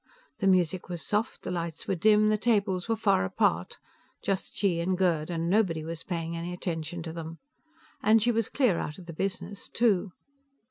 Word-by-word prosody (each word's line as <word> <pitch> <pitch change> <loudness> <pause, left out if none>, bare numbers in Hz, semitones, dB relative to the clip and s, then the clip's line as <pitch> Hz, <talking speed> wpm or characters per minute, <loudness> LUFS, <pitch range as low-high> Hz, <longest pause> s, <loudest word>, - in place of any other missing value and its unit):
The 195 - +1
music 185 -1 +2
was 175 -2 -4
soft, 215 +2 -1
the - - -3
lights 170 -2 -4
were - - +1
dim, 210 +3 +4
the 215 - +3
tables 200 -4 +1
were 225 - +3
far 95 - +2
apart; 95 - 0 0.5
just 195 -1 -2
she 185 -5 +2
and 180 +2 0
Gerd, 170 -4 +1
and 165 -1 -2
nobody 180 -5 +2
was 165 +1 -5
paying 170 -2 -3
any 170 +1 -4
attention 170 -1 -4
to 160 -1 -6
them. 165 0 -7 0.6
And 220 +2 +5
she 240 +3 +2
was 230 -2 0
clear 245 -11 +2
out 150 - -4
of 185 - -11
the 170 - -8
business, 195 +3 -4
too. 210 -5 +2
180 Hz, 190 wpm, -28 LUFS, 165-205 Hz, 0.6 s, And